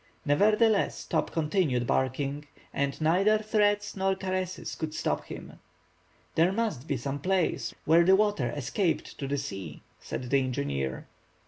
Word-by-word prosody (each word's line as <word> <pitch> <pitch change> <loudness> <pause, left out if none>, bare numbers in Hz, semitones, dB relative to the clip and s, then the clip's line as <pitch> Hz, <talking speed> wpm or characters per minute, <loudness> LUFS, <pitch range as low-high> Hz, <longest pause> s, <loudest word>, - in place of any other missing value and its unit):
Nevertheless, 210 +8 +3
Top - - 0
continued 155 -6 +1
barking, 140 +4 -1 0.3
and 140 -1 -1
neither 185 +7 +4
threats 205 -1 +1
nor 190 0 +1
caresses 185 -1 -3
could 155 -1 -4
stop 75 0 -1
him. - - -9 0.7
"There 170 +3 +3
must 195 - -2
be 140 - 0
some 140 +3 -4
place 185 +2 0
where 165 +2 +6
the 190 +2 +6
water 205 - +1
escaped 150 - -1
to 140 - -3
the 140 +1 -1
sea," 95 - -6 0.2
said 125 -1 -6
the 140 - +5
engineer. 70 - -2
155 Hz, 140 wpm, -28 LUFS, 135-195 Hz, 0.7 s, where